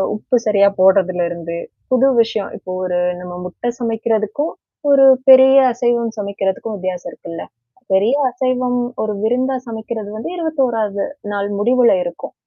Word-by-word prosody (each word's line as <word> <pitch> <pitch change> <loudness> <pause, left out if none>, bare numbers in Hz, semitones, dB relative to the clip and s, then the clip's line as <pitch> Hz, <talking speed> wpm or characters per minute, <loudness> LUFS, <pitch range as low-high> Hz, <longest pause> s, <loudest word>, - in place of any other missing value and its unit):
உப்பு 220 +4 -2
சரியா 200 -2 +4
போடுறதுல 185 -1 +3
இருந்து, 170 -1 -6 0.4
புது 255 +1 +4
விஷயம், 220 -3 -2
இப்போ 185 - -8
ஒரு 180 -1 -1 0.2
நம்ம 180 0 -8
முட்டை 180 +6 -4
சமைக்கிறதுக்கும் 225 +4 -1 0.4
ஒரு 275 -1 +6 0.2
பெரிய 265 0 +8 0.2
அசைவம் 235 -1 -1
சமைக்கிறதுக்கும் 200 +1 -3
வித்தியாசம் 185 -1 -5
இருக்குல்ல. 165 -1 -9 0.5
பெரிய 205 +7 +3 0.2
அசைவம் 250 0 -1 0.2
ஒரு 215 - -2
விருந்தாச் 255 +3 0
சமைக்கிறது 220 -1 -6
வந்து 220 - -5
21-வது 240 - -1 0.3
நாள் 200 0 -2
முடிவுல 245 +2 +4
இருக்கும். 175 -1 -7
220 Hz, 130 wpm, -18 LUFS, 195-250 Hz, 0.5 s, பெரிய